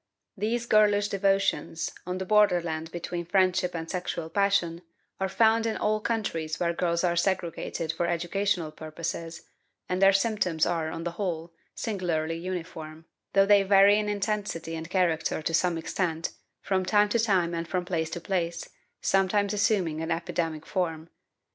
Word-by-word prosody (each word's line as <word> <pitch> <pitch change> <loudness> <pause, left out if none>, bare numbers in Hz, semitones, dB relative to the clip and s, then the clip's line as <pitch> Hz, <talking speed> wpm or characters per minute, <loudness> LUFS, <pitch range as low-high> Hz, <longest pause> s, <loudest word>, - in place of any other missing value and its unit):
These 225 +4 -1
girlish 205 -2 +4
devotions, 195 -4 0 0.2
on 180 0 -2
the 190 - -4
borderland 175 -6 +2
between 175 0 -4
friendship 185 0 +1
and 165 0 -4
sexual 170 -2 -4
passion, 185 -4 +1 0.4
are 190 0 0
found 225 +2 +3
in 220 - -1
all 215 0 +1
countries 165 -9 -2
where 170 -1 +1
girls 170 0 0
are 175 -1 +2
segregated 170 -3 -1
for 170 +1 -1
educational 175 0 -1
purposes, 165 +2 -6 0.4
and 180 +1 -1
their 195 0 +7
symptoms 195 -5 +1
are, 165 -2 -1
on 165 +1 -5
the 175 - -2
whole, 170 -2 -4 0.2
singularly 165 -6 -2
uniform, 165 -3 -6 0.3
though 195 0 +5
they 205 0 +6
vary 200 +1 +6
in 210 0 -1
intensity 205 -5 -2
and 160 +1 -6
character 175 -4 +1
to 165 - -2
some 175 0 +2
extent, 165 0 -2 0.3
from 190 -1 +1
time 205 +2 +3
to 235 - +1
time 190 -6 +2
and 165 0 -3
from 180 0 -2
place 160 -3 -1
to 175 - -5
place, 170 -2 -2 0.3
sometimes 195 +1 +2
assuming 195 -6 +1
an 160 - -3
epidemic 165 -1 -2
form. 165 -4 -2
180 Hz, 155 wpm, -27 LUFS, 165-200 Hz, 0.4 s, their